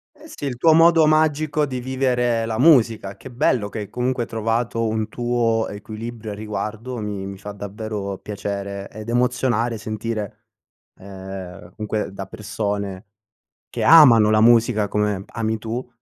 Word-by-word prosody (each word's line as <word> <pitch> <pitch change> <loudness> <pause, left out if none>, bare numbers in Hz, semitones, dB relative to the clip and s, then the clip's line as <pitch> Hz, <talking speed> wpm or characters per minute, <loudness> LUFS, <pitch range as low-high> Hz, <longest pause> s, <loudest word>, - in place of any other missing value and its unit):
Eh, 310 - -15
sì, 145 - -8
il 130 -3 -3
tuo 160 +5 +5
modo 165 -1 +6
magico 155 -1 +2
di 130 -3 -4
vivere 125 -3 0
la 110 -1 -3
musica. 115 -9 +4
Che 130 - -11
bello 120 -3 +1
che 110 - -6
hai, 105 - -6
comunque, 125 -1 -1
trovato 115 +1 -1
un 110 0 -2
tuo 120 -2 0
equilibrio 110 +2 -7
a - - -7
riguardo, 110 +4 -5
mi 105 -2 -4
mi 100 0 -7
fa 105 +1 -7
davvero 100 -1 -5
piacere 100 -1 -5
ed 110 +1 -8
emozionare, 120 -2 0
sentire, 110 0 -5 0.6
ehm, 95 -2 -9
comunque 105 -1 -3
da 95 0 -7
persone 100 -2 -4 0.6
che - - -3
amano 120 -10 +8
la 110 0 +4
musica 115 -2 +4
come 105 -1 -1
ami 110 -1 -2
tu, 115 +4 -5
110 Hz, 150 wpm, -22 LUFS, 105-125 Hz, 0.6 s, amano